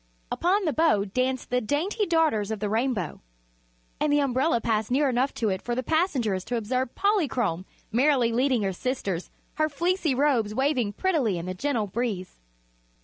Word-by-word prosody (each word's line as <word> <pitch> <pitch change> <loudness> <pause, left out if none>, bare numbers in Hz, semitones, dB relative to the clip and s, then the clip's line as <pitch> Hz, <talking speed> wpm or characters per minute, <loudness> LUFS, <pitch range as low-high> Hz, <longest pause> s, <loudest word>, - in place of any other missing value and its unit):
Upon 380 +3 +1
the 310 - +1
bow 215 -11 +3
danced 255 +6 -2
the 250 0 +2
dainty 350 - -1
Daughters 315 -12 +2
of 220 -2 -3
the 210 0 -2
Rainbow, 220 - -1 0.8
and 300 - +1
the 290 - +4
umbrella 265 -1 +2
passed 220 -2 0
near 275 +3 +2
enough 255 +1 +1
to 225 -4 0
it 190 -1 -2
for 240 - -3
the 255 - -2
passengers 255 - 0
to 245 - -2
observe 245 +3 -2
Polychrome 260 - 0 0.3
merrily 250 0 +3
leading 250 -1 +2
her 195 -1 -1
sisters, 195 -6 -3 0.3
her 310 0 +2
fleecy 340 -1 0
robes 250 -7 +1
waving 260 -6 +1
prettily 275 - +1
in 170 - -5
the 185 - -3
gentle 225 +2 -1
breeze. 205 - -4
250 Hz, 170 wpm, -26 LUFS, 215-295 Hz, 0.8 s, the